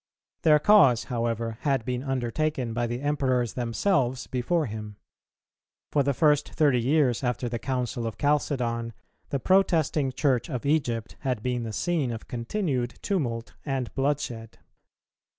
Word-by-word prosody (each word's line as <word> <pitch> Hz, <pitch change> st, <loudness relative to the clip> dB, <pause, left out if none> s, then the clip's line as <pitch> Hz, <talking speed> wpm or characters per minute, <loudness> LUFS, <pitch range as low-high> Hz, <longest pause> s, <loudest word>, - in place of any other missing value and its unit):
Their 155 Hz, -1 st, +6 dB
cause, 140 Hz, -, +5 dB
however, 115 Hz, -1 st, -2 dB
had 135 Hz, -6 st, 0 dB
been 125 Hz, -1 st, -2 dB
undertaken 135 Hz, 0 st, -1 dB
by 120 Hz, +1 st, 0 dB
the 120 Hz, +2 st, -4 dB
Emperors 130 Hz, -6 st, 0 dB
themselves 125 Hz, -, 0 dB
before 150 Hz, +6 st, 0 dB
him. 105 Hz, -2 st, -6 dB, 1.0 s
For 145 Hz, -, +3 dB
the 140 Hz, 0 st, 0 dB
first 150 Hz, -1 st, +3 dB
thirty 140 Hz, -6 st, +3 dB
years 135 Hz, -1 st, +2 dB
after 125 Hz, 0 st, -1 dB
the 120 Hz, 0 st, -3 dB
Council 125 Hz, -2 st, -2 dB
of 110 Hz, -, -6 dB
Chalcedon, 125 Hz, -6 st, 0 dB, 0.4 s
the 140 Hz, -, -1 dB
protesting 160 Hz, -6 st, +2 dB
Church 130 Hz, 0 st, +1 dB
of 130 Hz, -2 st, -4 dB
Egypt 125 Hz, -7 st, 0 dB
had 125 Hz, -5 st, -2 dB
been 125 Hz, -1 st, -1 dB
the 115 Hz, -1 st, -4 dB
scene 160 Hz, +1 st, 0 dB
of 115 Hz, -1 st, -7 dB
continued 125 Hz, -, -2 dB
tumult 120 Hz, -, -2 dB
and 135 Hz, -4 st, -3 dB
bloodshed. 135 Hz, -5 st, -2 dB
125 Hz, 140 wpm, -26 LUFS, 120-145 Hz, 1.0 s, Their